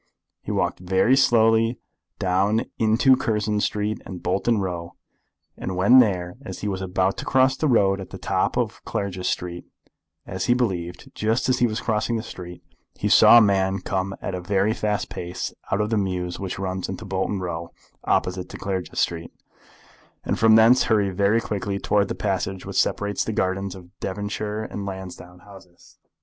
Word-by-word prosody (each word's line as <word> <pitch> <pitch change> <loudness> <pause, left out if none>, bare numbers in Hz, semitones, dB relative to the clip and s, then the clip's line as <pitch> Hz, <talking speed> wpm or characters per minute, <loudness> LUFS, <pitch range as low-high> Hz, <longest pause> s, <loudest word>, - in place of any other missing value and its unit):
He - - -5
walked - - -1
very 95 +8 +3
slowly 115 -2 +3 0.4
down 95 +4 +1
into 115 +4 +4
Curzon 105 -3 -1
Street 105 +1 -1
and 90 -3 -9
Bolton 100 +6 +1
Row, 85 -3 -4 0.6
and 95 - -5
when 100 +8 +6
there, 90 -6 +1
as - - -8
he 105 - -3
was 95 -2 -3
about 95 0 0
to - - -4
cross 130 0 +3
the 155 - 0
road 100 -6 +3
at 95 - -9
the - - -8
top - - -1
of - - -2
Clarges 95 -2 -3
Street, 85 0 -4 0.6
as 95 0 -4
he 120 - +3
believed, 90 -8 -3
just 110 +4 0
as 130 - +2
he 120 - +4
was 110 0 -3
crossing 110 +1 0
the 110 - -4
street, 90 -5 -9 0.3
he - - -2
saw 120 - +8
a - - +8
man 95 -2 +2
come 95 +1 -2
at 95 - -3
a 90 - -4
very 100 +3 +1
fast 105 -3 -1
pace 90 +1 -5 0.2
out 100 - +1
of 105 +1 -2
the 110 - +2
mews 90 -2 -3
which 95 -2 -4
runs 95 -1 -3
into 95 +3 -6
Bolton 95 +1 -2
Row, 85 -2 -4 0.3
opposite 90 0 0
to - - -8
Clarges 95 -2 -4
Street, 85 -1 -1 0.9
and - - -2
from 110 -1 +6
thence 115 +3 +6
hurry 105 -3 +2
very 100 +4 +2
quickly 100 -3 -3
towards 100 0 +1
the - - -4
passage 95 -1 -2
which - - +1
separates 105 0 -1
the 110 - -3
gardens 95 0 -1
of 90 -2 -13
Devonshire 105 +2 -3
and 105 -2 -6
Lansdowne 90 -2 -8
Houses. 95 -3 -17
100 Hz, 180 wpm, -23 LUFS, 95-110 Hz, 0.9 s, saw